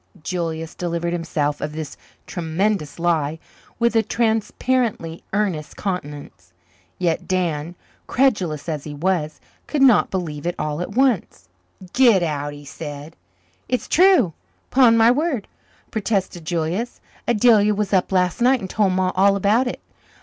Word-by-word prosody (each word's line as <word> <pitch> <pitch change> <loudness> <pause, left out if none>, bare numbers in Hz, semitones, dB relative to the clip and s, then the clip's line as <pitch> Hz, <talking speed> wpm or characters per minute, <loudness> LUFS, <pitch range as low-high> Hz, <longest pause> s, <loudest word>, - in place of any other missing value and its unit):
Julius 165 -2 -3
delivered 170 0 -2
himself 150 -4 -2
of 150 0 -3
this 155 -2 -6 0.3
tremendous 170 -1 -2
lie 160 -3 0 0.4
with 235 0 +1
a 225 - +5
transparently 220 -4 -1
earnest 190 -7 -2
countenance. 145 - -6 0.4
Yet 170 -3 -1
Dan, 170 -3 -1 0.3
credulous 190 - +1
as 155 -4 -3
he 150 -1 -7
was, 160 -1 -1 0.3
could 290 -3 +1
not 250 -6 +5
believe 165 -5 -4
it 175 - -1
all 150 +2 -2
at 180 - -5
once. 240 - +1 0.4
"Git 235 -8 +5
out," 145 -2 -2
he 145 0 -12
said. 145 +1 -8 0.5
"It's 250 - -1
true, 350 - +4 0.4
'pon 245 -3 +5
my 225 +1 +6
word," 280 - -1 0.4
protested 195 -6 -2
Julius. 175 +8 -2 0.3
"Adelia 215 -2 +4
was 210 0 -2
up 185 0 +2
last 180 +2 +1
night 255 +2 +4
and 190 -4 -6
told 200 -3 +2
Ma 185 0 +1
all 195 +1 +4
about 210 +6 +2
it. - - -5
180 Hz, 140 wpm, -21 LUFS, 160-220 Hz, 0.5 s, my